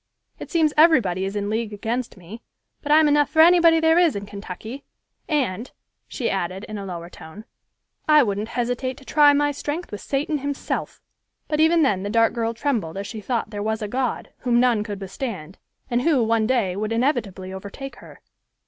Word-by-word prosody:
It - - -8
seems 315 -3 +2
everybody 235 - +4
is 195 +1 -4
in 205 0 -2
league 220 +1 -2
against 230 +3 -3
me, 190 +6 -11 0.4
but 295 - -3
I'm 310 0 +6
enough 290 -1 +3
for 315 - -2
anybody 335 -1 +6
there 320 +1 +4
is 340 -7 +3
in 200 0 -4
Kentucky; 205 +6 -8 0.5
and," 250 - -1 0.4
she 250 - -3
added, 190 0 -2
in 215 -2 -6
a 200 - -6
lower 170 -2 -6
tone, 175 +5 -12 0.6
"I 300 -1 +7
wouldn't 205 -1 -2
hesitate 245 +2 -2
to 270 - -15
try 295 +1 +5
my 290 0 +2
strength 295 +4 -5
with 205 - -6
Satan 290 +2 -1
himself;" 285 0 -4 0.5
but 300 - -1
even 320 +1 +4
then 200 -9 +1
the 200 - -4
dark 230 +1 +3
girl 230 -1 -2
trembled 225 - -2
as 200 - -4
she 215 +1 -7
thought 230 0 -2
there 205 -1 -5
was 220 +1 -2
a - - -2
God, 255 +3 -2
whom 240 -1 +2
none 240 -4 +3
could 205 -2 -6
withstand, 195 - -6 0.3
and 245 -1 0
who, 275 -4 +3
one 225 -1 +1
day, 225 -8 +1
would 215 +2 -3
inevitably 225 -7 -1
overtake 200 +8 -8
her. - - -15
230 Hz, 195 wpm, -23 LUFS, 200-285 Hz, 0.6 s, I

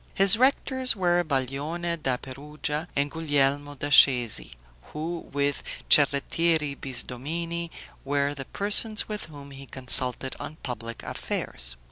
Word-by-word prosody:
His 195 +2 +7
rectors 260 0 +3
were 175 -2 +1
Baglione 150 +4 -3
da 130 -3 -1
Perugia 150 +4 -5
and 140 0 0
Guglielmo 145 -2 0
da 145 +1 -5
Scesi, 125 -6 +4 0.4
who, 165 +2 -6
with 145 0 -1 0.3
Cerrettieri 150 +1 +3
Bisdomini, 165 +7 -5 0.3
were 140 +1 -1
the 135 -2 -8
persons 210 - +1
with 210 -1 -5
whom 140 -3 -12
he 135 0 -11
consulted 130 0 +3
on 155 - -8
public 115 -2 -7
affairs. - - -1
145 Hz, 120 wpm, -25 LUFS, 135-170 Hz, 0.4 s, His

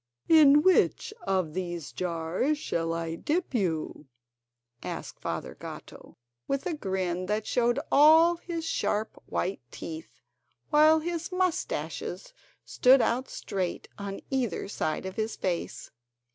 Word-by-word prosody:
"In 300 -2 +7
which 375 +3 +3
of 185 -5 0
these 175 -5 -4
jars 180 - -1
shall 165 - -2
I 165 0 -3
dip 310 - -2
you?" 165 - -2 0.7
asked - - -6
Father - - -4
Gatto, - - -11 0.3
with 275 0 -1
a 360 - -1
grin 185 - -2
that 210 +1 -1
showed 240 +1 +1
all 320 +4 +7
his 335 -1 -5
sharp 215 -8 -1
white 190 +2 -2
teeth, 160 -1 -8 0.5
while 310 +1 +6
his 340 +1 -4
moustaches 365 +6 -2 0.3
stood 260 +2 +5
out 250 +2 0
straight 185 -3 -4
on 200 -1 -5
either 250 -10 -1
side 155 -4 -2
of 190 0 -6
his 220 0 -2
face. 175 -3 -3
220 Hz, 125 wpm, -28 LUFS, -, 0.7 s, In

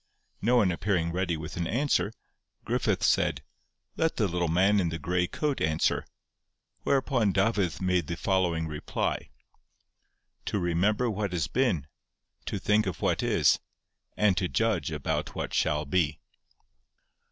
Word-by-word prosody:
No 120 +4 +3
one 105 -7 +4
appearing 85 -1 0
ready 90 -1 -1
with 80 +2 -7
an 85 -1 -1
answer, 125 - +1 0.5
Griffith - - 0
said: - - +2 0.5
'Let 160 0 +1
the 105 - +1
little 90 -1 -1
man 95 +5 +3
in 85 -3 +1
the 80 - -3
grey 90 +2 0
coat 150 - -2
answer;' 80 0 +1 0.7
whereupon 130 -6 +2
Dafydd 95 -4 +1
made 90 -4 +1
the 85 - -3
following 90 -4 +1
reply: 75 -1 -3 1.2
'To - - -1
remember 95 +7 +1
what 105 -4 -2
has 85 -3 0
been—to 85 - -3
think 105 0 +2
of 95 - -4
what - - +1
is—and 105 -4 0
to 90 -1 +1
judge 105 -7 0
about - - -3
what - - -4
shall 75 0 +1
be. 75 -1 +1
90 Hz, 135 wpm, -28 LUFS, 85-105 Hz, 1.2 s, one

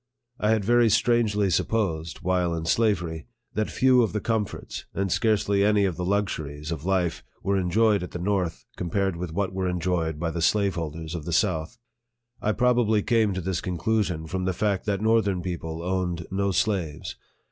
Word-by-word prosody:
I 105 - +1
had 110 -3 +2
very 120 +1 +4
strangely 110 -3 +2
supposed, 85 -5 -1
while 90 -1 +1
in 80 0 -4
slavery, 85 -5 0 0.3
that 110 0 -1
few 130 -1 +4
of 110 - 0
the 105 - 0
comforts, 110 -2 -3
and 95 -1 -1
scarcely 100 -2 +2
any 105 -1 +4
of 90 -4 -1
tho 90 +2 -3
luxuries, 80 -7 -2
of 80 -1 -4
life 90 -3 0 0.2
were 100 - +1
enjoyed 100 +3 +3
at 90 - -5
the - - -6
north, 90 -2 -1
compared 95 +2 -1
with 85 -1 -5
what 95 +2 -1
were 95 -1 -1
enjoyed 85 -3 -1
by 85 0 -1
the 85 - -3
slaveholders 85 -5 0
of 80 -4 -5
the 85 - -4
south. 80 -3 0 0.6
I 105 - +1
probably 120 -3 +2
came 110 -4 +2
to 95 - -2
this 90 -1 -2
conclusion 90 -2 -1
from 90 +3 -3
the 95 - 0
fact 100 +1 -1
that 100 -1 0
northern 110 -5 +2
people 85 -2 -4
owned 90 -2 -1
no 100 +1 0
slaves. 95 -5 -1
95 Hz, 180 wpm, -26 LUFS, 85-105 Hz, 0.6 s, very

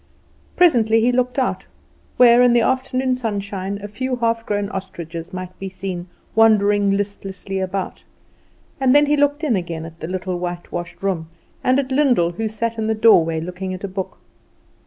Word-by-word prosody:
Presently 230 -11 +4
he 240 +2 +3
looked 250 +1 0
out, 260 -2 -1 0.5
where, 240 -1 +7
in 245 -1 +5
the 240 - +4
afternoon 260 0 0
sunshine, 200 -4 -3
a - - -4
few 255 +5 -3
half 230 -1 -1
grown 205 -1 -1
ostriches 170 -3 -6
might 185 -1 -7
be 195 - -5
seen 185 -1 -6 0.3
wandering 205 -2 +4
listlessly 195 -1 -4
about, 190 0 -4 0.8
and 265 0 +3
then 290 0 +6
he 295 +1 +2
looked 290 +1 +1
in 275 -8 +2
again 170 -3 -4
at 165 0 -11
the 160 - -5
little 185 0 -3
whitewashed 175 0 -6
room, 170 -5 -2 0.3
and 255 +1 +3
at 270 -1 -1
Lyndall, 255 -11 +3
who 220 +6 -3
sat 225 +1 -3
in 220 - -1
the 220 - +1
doorway 165 -8 +4
looking 180 +3 -5
at 185 - -11
a - - -2
book. 190 0 -5
205 Hz, 175 wpm, -20 LUFS, 185-245 Hz, 0.8 s, where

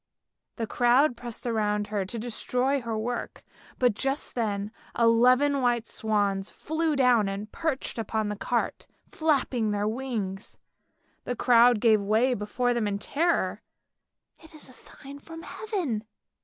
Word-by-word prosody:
" - - -59
The 230 - -1
crowd 245 +4 +3
pressed 240 -1 -7
around 210 -3 0
her 200 -2 0
to 215 +5 -7
destroy 250 +4 -1
her 230 -2 -3
work, 235 +3 -4 0.3
but 245 -3 +3
just 270 +6 -3
then 210 -3 -2 0.3
eleven 250 +5 +4
white 240 -2 +1
swans 205 -3 -1
flew 315 0 -1
down 245 -6 +4
and 205 +2 -5
perched 310 -7 -3
upon 220 -1 -1
the 210 - -3
cart 235 +3 -2 0.2
flapping 270 -8 0
their 205 0 0
wings. 220 -5 -4 0.7
The 245 - -2
crowd 240 -1 +5
gave 220 -2 +4
way 220 +6 +2
before 245 +3 -1
them 235 -3 0
in 200 -1 -1
terror. 330 +11 0 0.8
"It 320 -1 -14
is 305 - -9
a 255 - -15
sign 280 +2 -11
from 325 +3 -10
Heaven! 335 - -3
240 Hz, 145 wpm, -27 LUFS, 215-265 Hz, 0.8 s, crowd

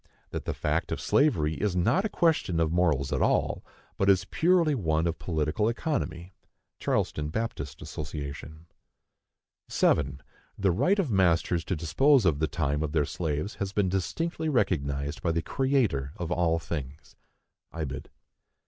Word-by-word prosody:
That - - -5
the - - -2
fact - - -1
of - - -2
slavery 80 - +2
is 100 -3 0
not 165 - +2
a - - 0
question 160 - +1
of 80 -1 +1
morals 80 -6 +1
at - - 0
all, - - +1 0.4
but 95 - +3
is 95 -2 +4
purely 170 -2 +3
one 80 - 0
of 85 -1 -2
political 80 +6 0
economy. 95 - -3 0.5
(Charleston 75 0 -1
Baptist 95 - -4
Association.) 75 +1 -7 1.0
7. 70 -2 +1 0.3
The 95 -2 +2
right 145 - +2
of 175 - 0
masters 85 -3 +2
to 95 - -1
dispose 95 - +3
of 75 -5 +2
the 80 - +1
time 75 -2 -1
of 75 -1 -2
their 75 -3 +2
slaves 80 +6 -3
has 100 0 -2
been 100 -2 +1
distinctly 160 - -2
recognized 75 - 0
by 85 - +1
the 80 0 -1
Creator 120 - 0
of 85 -1 -4
all 85 -2 +2
things. 75 -4 -6 0.6
(Ibid.) 70 -5 -5
85 Hz, 150 wpm, -28 LUFS, 75-105 Hz, 1.0 s, is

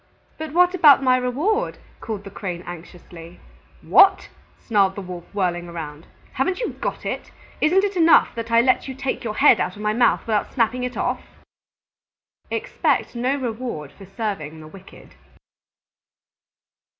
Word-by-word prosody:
"But 315 -2 -5
what 360 +1 +4
about 295 -7 +6
my 255 -1 +4
reward!" 295 - -1 0.2
called 215 -3 -6
the 200 - -10
Crane 180 -3 -6
anxiously. 175 0 -11 0.4
"What!" 390 - +5 0.3
snarled 195 -4 +1
the 200 - -5
Wolf, 180 -2 -8
whirling 175 -3 -2
around. 160 -2 -8 0.3
"Haven't 365 - -1
you 485 - -2
got - - -5
it? - - -4 0.3
Isn't 365 +6 +3
it 405 -1 -1
enough 330 -2 +5
that 230 0 -6
I 230 0 +5
let 255 +2 +1
you 265 - -6
take 270 0 -3
your 215 -2 -4
head 270 -4 +5
out 185 - -2
of 210 - -10
my 210 0 +1
mouth 240 +1 +3
without 215 -2 -1
snapping 245 0 0
it 250 0 -4
off?" - - -1 1.3
_Expect - - -1
no 250 +3 0
reward 235 - -5
for 195 - -14
serving 195 -7 -5
the 155 - -11
wicked. 190 +4 -15
230 Hz, 155 wpm, -22 LUFS, 185-270 Hz, 1.3 s, about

